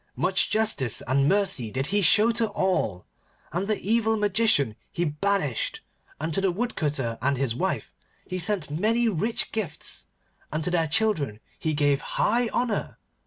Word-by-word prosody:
Much -, -, +1 dB
justice 215 Hz, -, +1 dB
and 135 Hz, +3 st, +2 dB
mercy 190 Hz, -, +1 dB
did 130 Hz, +5 st, -2 dB
he 205 Hz, -, +3 dB
show 210 Hz, +6 st, +5 dB
to 230 Hz, -1 st, +1 dB
all, 185 Hz, -, -1 dB, 0.5 s
and 180 Hz, +4 st, -1 dB
the 215 Hz, -1 st, 0 dB
evil 220 Hz, +1 st, +1 dB
Magician 205 Hz, -, +2 dB, 0.2 s
he 175 Hz, -, -1 dB
banished, 150 Hz, -, -1 dB, 0.4 s
and 160 Hz, +2 st, -2 dB
to 195 Hz, -, +1 dB
the 195 Hz, -, +2 dB
Woodcutter 150 Hz, -, -2 dB
and 140 Hz, +1 st, +1 dB
his 130 Hz, -3 st, 0 dB
wife 185 Hz, +10 st, -2 dB, 0.3 s
he 185 Hz, 0 st, -4 dB
sent 175 Hz, -4 st, 0 dB
many 225 Hz, +9 st, +2 dB
rich 220 Hz, +3 st, -1 dB
gifts, 195 Hz, -9 st, -3 dB, 0.4 s
and 155 Hz, +1 st, -2 dB
to 180 Hz, -, -1 dB
their 165 Hz, -2 st, +2 dB
children 155 Hz, -, 0 dB, 0.2 s
he 155 Hz, -1 st, -1 dB
gave 145 Hz, -1 st, +2 dB
high 240 Hz, +2 st, +1 dB
honour. 235 Hz, -1 st, -1 dB
180 Hz, 160 wpm, -26 LUFS, 145-215 Hz, 0.5 s, show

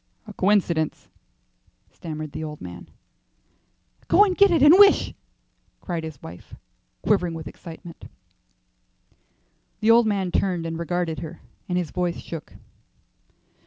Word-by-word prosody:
"A 215 Hz, -, -10 dB
coincidence," 185 Hz, -6 st, 0 dB, 0.8 s
stammered 155 Hz, -2 st, -7 dB
the 155 Hz, -, -6 dB
old 150 Hz, -1 st, -7 dB
man. 90 Hz, -1 st, -10 dB, 1.2 s
"Go 410 Hz, -, +6 dB
and 375 Hz, -3 st, -1 dB
get 400 Hz, 0 st, +6 dB
it 330 Hz, -6 st, +3 dB
and 295 Hz, +2 st, +9 dB
wish," 405 Hz, -1 st, +6 dB, 0.7 s
cried 170 Hz, -3 st, -4 dB
his 155 Hz, -4 st, -8 dB
wife, 85 Hz, +2 st, -11 dB, 0.5 s
quivering 180 Hz, -5 st, +1 dB
with 160 Hz, -1 st, -7 dB
excitement. 170 Hz, 0 st, -11 dB, 1.7 s
The 220 Hz, +1 st, +4 dB
old 230 Hz, 0 st, +5 dB
man 195 Hz, -4 st, -1 dB
turned 180 Hz, -3 st, 0 dB
and 165 Hz, 0 st, -4 dB
regarded 170 Hz, -1 st, -2 dB
her, 165 Hz, 0 st, -8 dB, 0.3 s
and 180 Hz, -, 0 dB
his 175 Hz, -4 st, -2 dB
voice 180 Hz, -2 st, -2 dB
shook. 165 Hz, -2 st, -8 dB
175 Hz, 125 wpm, -24 LUFS, 160-205 Hz, 1.7 s, and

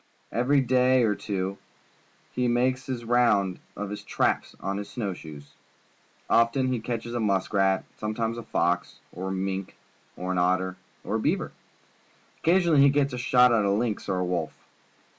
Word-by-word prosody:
Every 135 Hz, +4 st, +2 dB
day 130 Hz, 0 st, +3 dB
or 110 Hz, -2 st, +3 dB
two 100 Hz, -1 st, -3 dB, 0.7 s
he 125 Hz, 0 st, 0 dB
makes 125 Hz, +2 st, +1 dB
the 125 Hz, -3 st, -4 dB
round 115 Hz, -6 st, +2 dB, 0.2 s
of 105 Hz, -1 st, -4 dB
his 105 Hz, -, -5 dB
traps -, -, -1 dB
on 100 Hz, 0 st, -3 dB
his 100 Hz, -, -6 dB
snow 105 Hz, -6 st, -3 dB
shoes. 75 Hz, -4 st, -11 dB, 0.7 s
Often 130 Hz, +3 st, +3 dB
he 125 Hz, -, -1 dB
catches 115 Hz, 0 st, -4 dB
a 120 Hz, -, -1 dB
musk 100 Hz, -3 st, 0 dB
rat, 95 Hz, -1 st, +2 dB
some 110 Hz, 0 st, -3 dB
times 115 Hz, 0 st, -2 dB
a -, -, -5 dB
fox, -, -, -1 dB, 0.2 s
or 95 Hz, +2 st, -6 dB
a -, -, -2 dB
mink, 95 Hz, 0 st, -3 dB, 0.4 s
or 90 Hz, +1 st, -3 dB
an 90 Hz, -, 0 dB
otter, 95 Hz, +1 st, +1 dB, 0.3 s
or -, -, -1 dB
a -, -, -3 dB
beaver. -, -, 0 dB, 0.9 s
Occasionally 170 Hz, -4 st, +4 dB
he 140 Hz, -, +7 dB
gets 140 Hz, -1 st, +1 dB
a 125 Hz, -, -3 dB
shot 125 Hz, 0 st, +5 dB
at 110 Hz, -2 st, +3 dB
a 100 Hz, -, +1 dB
lynx 105 Hz, 0 st, -1 dB
or 95 Hz, -, 0 dB
a 90 Hz, -, 0 dB
wolf. 85 Hz, -3 st, -2 dB
110 Hz, 180 wpm, -26 LUFS, 95-125 Hz, 0.9 s, he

